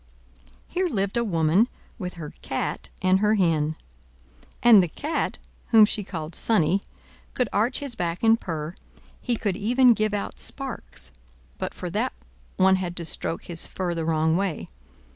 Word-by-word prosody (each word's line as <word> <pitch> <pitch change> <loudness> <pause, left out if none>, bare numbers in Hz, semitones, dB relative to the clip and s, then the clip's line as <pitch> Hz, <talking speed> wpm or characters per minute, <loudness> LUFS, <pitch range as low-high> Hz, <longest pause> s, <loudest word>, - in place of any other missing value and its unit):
Here 365 +1 0
lived 200 -7 -1
a 235 - +2
woman, 175 +2 +3 0.3
with 180 -3 -5
her 155 -3 -8
Cat - - -3
and 185 +1 +4
her 210 +1 +3
Hen. 160 -5 +1 0.9
And 230 -4 +9
the 175 - 0
Cat, 300 - -2 0.3
whom 220 -2 +7
she 210 0 -2
called 165 -4 -6
Sonnie, 195 -3 +2 0.5
could 250 - +1
arch 225 +8 +1
his 280 -3 -3
back 175 -3 -3
and 225 +1 +5
purr, 160 -2 -4 0.5
he 245 - 0
could 205 -4 -1
even 245 +5 +4
give 215 -1 0
out 200 - -4
sparks; 150 - -4 0.5
but - - -4
for - - -5
that - - -1 0.4
one 190 0 +5
had 180 -2 -4
to 170 - -3
stroke 165 - -1
his 170 -2 -2
fur 180 -2 -3
the 165 -1 -2
wrong 160 0 +2
way. 190 -4 -2
190 Hz, 160 wpm, -25 LUFS, 165-225 Hz, 0.9 s, And